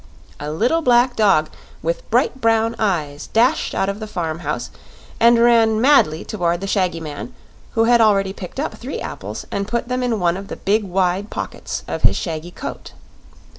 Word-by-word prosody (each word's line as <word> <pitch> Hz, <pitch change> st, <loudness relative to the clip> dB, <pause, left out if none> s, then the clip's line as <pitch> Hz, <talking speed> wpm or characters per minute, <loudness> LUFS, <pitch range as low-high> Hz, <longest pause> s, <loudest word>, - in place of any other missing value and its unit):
A 150 Hz, +1 st, -4 dB
little 245 Hz, -, +1 dB
black 245 Hz, -2 st, +3 dB
dog 195 Hz, -8 st, +3 dB, 0.3 s
with -, -, -3 dB
bright 265 Hz, -, +1 dB
brown 225 Hz, 0 st, +2 dB
eyes 155 Hz, -8 st, -1 dB
dashed 250 Hz, +8 st, +2 dB
out 195 Hz, -, +1 dB
of 200 Hz, +1 st, -3 dB
the 215 Hz, -, -6 dB
farm 165 Hz, -5 st, -3 dB
house -, -, -4 dB, 0.5 s
and 235 Hz, +1 st, +6 dB
ran 230 Hz, -2 st, +4 dB
madly 225 Hz, -, +4 dB
toward 175 Hz, -4 st, -1 dB
the -, -, -3 dB
shaggy 185 Hz, -4 st, 0 dB
man, 150 Hz, -3 st, -7 dB, 0.4 s
who 225 Hz, -, +3 dB
had 235 Hz, 0 st, +5 dB
already 195 Hz, -3 st, +3 dB
picked 190 Hz, +6 st, -8 dB
up 295 Hz, -, -2 dB
three 260 Hz, +4 st, -6 dB
apples -, -, -6 dB
and 200 Hz, 0 st, -2 dB
put 235 Hz, +2 st, -2 dB
them 250 Hz, 0 st, -1 dB
in 240 Hz, -3 st, 0 dB
one 175 Hz, 0 st, +1 dB
of 195 Hz, 0 st, -8 dB
the -, -, -6 dB
big 210 Hz, +2 st, +1 dB
wide 190 Hz, +2 st, 0 dB
pockets -, -, -5 dB
of -, -, -4 dB
his -, -, +3 dB
shaggy 165 Hz, 0 st, -4 dB
coat. -, -, -8 dB
210 Hz, 185 wpm, -20 LUFS, 175-235 Hz, 0.5 s, and